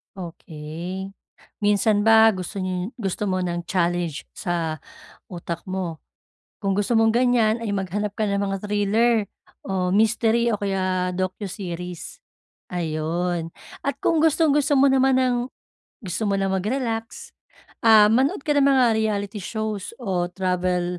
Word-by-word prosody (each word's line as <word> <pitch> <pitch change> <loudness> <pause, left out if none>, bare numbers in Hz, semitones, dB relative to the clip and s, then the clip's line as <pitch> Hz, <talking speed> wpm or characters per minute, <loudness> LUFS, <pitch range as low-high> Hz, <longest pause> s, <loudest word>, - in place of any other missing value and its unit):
Okey. 175 +1 -7 0.5
Minsan 205 0 +2
ba 225 0 +7
gusto 190 +1 -5
niyo 185 +3 -3
gusto 210 -2 -2
mo 185 -1 0
ng 175 -1 -3
challenge 175 -4 -1
sa 165 -3 -2 0.5
utak 170 -2 -5
mo? 185 -4 -4 0.6
Kung 195 -1 +1
gusto 205 +3 0
mong 225 0 +4
ganyan 240 -3 +3
ay 230 -2 -3
maghanap 200 +2 -2
ka 215 - 0
ng 200 0 0
mga 195 -1 -1
thriller, 210 +3 +2 0.5
o 185 -2 -1
mystery 225 +3 +3
o 225 - +1
kaya 185 -2 -1
docu-series. 180 -2 -5 0.5
Ayun. 165 0 -2 0.3
At 280 -1 -2
kung 325 -2 +2
gustong 320 -2 +3
gusto 295 0 +2
mo 275 +1 +6
naman 265 0 +3
ng 250 -1 +2 0.7
gusto 200 +3 -3
mo 200 - +1
na 195 0 0
mag-relax, 225 +3 -3 0.5
ah, 215 -2 +7
manood 270 - +2
ka 295 - +1
ng 280 -1 +4
mga 265 -2 +5
reality 210 -1 -2
shows 215 0 -4
o 185 -5 0
travel 180 -1 -1
195 Hz, 135 wpm, -23 LUFS, 180-225 Hz, 0.7 s, ba